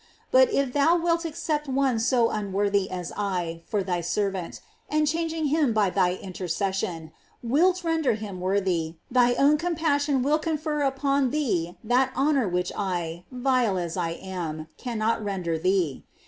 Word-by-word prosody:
But - - +6
if 275 -9 0
thou 310 +4 +4
wilt 335 0 0
accept 310 -2 -2
one 265 -3 +1
so 235 0 +2
unworthy 200 -1 0
as 180 -2 -5
I 180 -5 -2
for 205 -2 0
thy 180 -2 -1
servant, 190 0 -2 0.3
and 305 0 +2
chang 330 +2 0
ing 320 -1 -2
him 295 -5 +2
by 205 -4 +2
thy 180 -2 +2
intercession, 180 -3 -3 0.3
wilt 350 +10 +2
render 325 -7 +1
him 205 -4 -7
worthy, 185 -4 0 0.2
thy 245 -1 +4
own 295 +2 +4
compassion 295 -5 +1
will 300 +3 +2
confer 310 -2 -2
upon 275 -1 +1
thee 220 - -1
that 250 +3 +2
honor 270 -5 +2
which 180 0 -1
I, 175 -3 -3
vile 250 -5 +1
as 170 -2 -3
I 170 -3 -1
am, 165 -4 -6
cannot 225 -2 -1
render 180 -5 -2
thee. 180 -5 0
225 Hz, 155 wpm, -26 LUFS, 185-290 Hz, 0.3 s, But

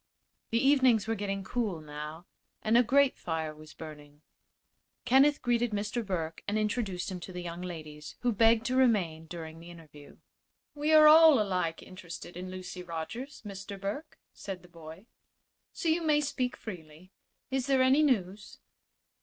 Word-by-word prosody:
The 230 - +1
evenings 260 -5 +4
were 225 - +1
getting 195 -2 -3
cool, 210 -5 -2
now, 150 +2 -8 0.4
and 220 +1 +2
a 240 - +8
grate 270 +3 +3
fire 160 -2 -3
was 155 +1 -14
burning. 150 -1 -11 0.8
Kenneth 275 +3 +4
greeted 240 -2 +1
Mr. 210 +3 -2
Burke 165 -5 -4
and 205 +1 0
introduced 210 -4 -2
him 185 - -5
to 180 - -9
the 180 -1 -6
young 170 0 -6
ladies, 155 -4 -8
who 245 - +2
begged 225 +1 +4
to 255 0 0
remain 185 -11 +2
during 160 -1 -8
the 170 +1 -12
interview. 155 -4 -14 0.6
"We 300 +1 -1
are 310 -1 +8
all 315 -3 +8
alike 180 -5 -1
interested 175 -2 -10
in 180 +1 -6
Lucy 185 0 -7
Rogers, 180 - -7
Mr. 195 0 -7
Burke," 210 +11 -5 0.2
said 190 -2 -7
the - - -15
boy; 165 +3 -12 0.7
"so 345 - -4
you 325 +2 +2
may 305 -2 +3
speak 255 -4 -2
freely. 175 -3 -10 0.4
Is 265 0 -1
there 265 -2 +4
any 265 +3 +5
news?" 205 -8 0
195 Hz, 160 wpm, -30 LUFS, 165-245 Hz, 0.8 s, a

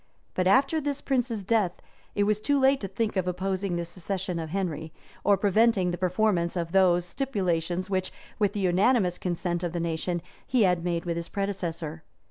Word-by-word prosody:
But 185 0 +1
after 275 +9 +4
this 285 -1 -2
prince's 245 -6 -1
death, 200 -3 +2 0.4
it 205 - +3
was 210 +1 +1
too 285 +4 +2
late 265 +1 +4
to 195 - -2
think 210 +3 -2
of 185 -2 0
opposing 185 +1 -1
the 170 0 -2
succession 180 +1 -4
of 160 -1 -4
Henry, 160 -4 -3 0.3
or 200 -1 +4
preventing 200 -1 +3
the 175 - -3
performance 185 -2 +1
of 170 -2 -2
those 180 -2 +4
stipulations 180 - -1
which, 185 -1 -1 0.3
with 205 -2 +2
the 205 - -2
unanimous 185 +1 +3
consent 175 -1 -2
of 175 -2 -3
the 175 - -1
nation, 170 +1 -2 0.2
he 245 -3 +3
had 180 -3 +2
made 170 -1 -1
with 170 -1 -1
his 170 - -4
predecessor. 170 -5 -3
185 Hz, 185 wpm, -27 LUFS, 175-210 Hz, 0.4 s, after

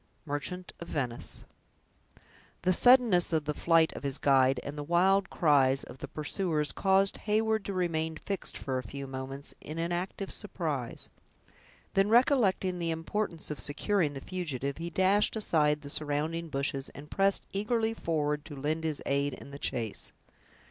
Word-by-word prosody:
—Merchant 150 +5 -4
of 170 - -7
Venice 125 -7 -4 1.2
The 185 +1 +4
suddenness 240 -6 +6
of 160 -2 +1
the 150 - -1
flight 165 +1 +3
of - - -6
his 140 -1 -1
guide, 135 -2 +4
and 140 - -6
the 150 - -4
wild 185 +4 +3
cries 135 -4 +3
of 125 - -11
the - - -6
pursuers, 155 0 -1
caused 195 0 +2
Heyward 220 0 +2
to 200 - -3
remain 160 -3 -1
fixed, 195 -2 -3
for 130 -2 -2
a - - -6
few 140 +1 -7
moments, 135 +1 -5
in 155 - -7
inactive 175 +3 -3
surprise. 155 - -2 0.8
Then 195 +1 +3
recollecting 215 -7 +3
the 170 -1 -1
importance 165 +1 -2
of 150 - -5
securing 155 +1 +1
the 135 - -7
fugitive, 140 -6 -4
he 170 +1 -3
dashed 190 +6 +2
aside 150 -8 +2
the 140 - -8
surrounding 155 +3 -2
bushes, 135 -1 -1
and 145 +1 -11
pressed 195 0 +2
eagerly 220 +3 0
forward 150 -7 -1
to 150 - -8
lend 155 +4 -2
his 155 -2 -2
aid 140 -1 0
in 140 - -11
the 140 - -8
chase. 115 -7 -2
160 Hz, 160 wpm, -30 LUFS, 140-190 Hz, 1.2 s, suddenness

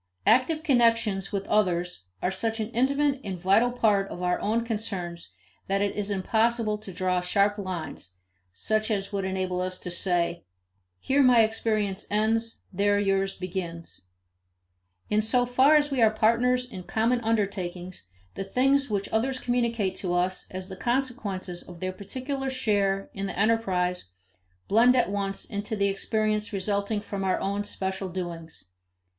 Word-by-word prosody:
Active 310 +5 +3
connections 230 -8 +2
with 200 -1 -2
others 180 - 0 0.2
are 180 - +1
such 225 +4 -2
an 220 +1 -3
intimate 275 +3 +1
and 190 -3 -4
vital 195 +7 +3
part 210 -5 +2
of 180 - -6
our 180 0 +1
own 230 +3 0
concerns 185 - -4 0.3
that 195 +1 +1
it 200 - -1
is 205 -1 -2
impossible 220 +2 +1
to 210 -2 -9
draw 180 0 0
sharp 200 +3 +2
lines, 175 - -6 0.4
such 215 - -1
as 200 -1 -2
would 195 -1 -1
enable 185 -1 -1
us 185 0 -3
to 180 - -7
say, 175 -1 0 0.6
"Here 275 - +2
my 250 -3 +6
experience 215 -3 -1
ends; 225 +2 0
there 205 +2 +2
yours 195 -1 +1
begins." 170 - -6 1.0
In 210 +1 +3
so 245 +3 +2
far 260 +5 +5
as 295 -1 +3
we 265 -3 +1
are 220 - +7
partners 235 +3 +2
in 210 -7 -8
common 230 +6 0
undertakings, 185 - -2 0.3
the - - -4
things 270 +7 +2
which 200 -2 -1
others 255 +4 0
communicate 235 -6 0
to 175 -2 -2
us 180 +1 -1
as 185 0 -6
the 190 - -7
consequences 225 -7 -2
of 175 -2 -12
their 185 0 -3
particular 265 +7 -4
share 200 -6 0
in 195 0 -3
the - - -6
enterprise 185 - +1 0.6
blend 240 +4 +5
at 245 -6 +2
once 195 -1 -2
into 205 +2 -4
the 200 -1 +2
experience 215 +1 -1
resulting 200 +1 -1
from 200 -1 -5
our 185 -1 +1
own 200 +1 -1
special 190 -1 -3
doings. 170 -3 -6
205 Hz, 155 wpm, -27 LUFS, 185-230 Hz, 1.0 s, are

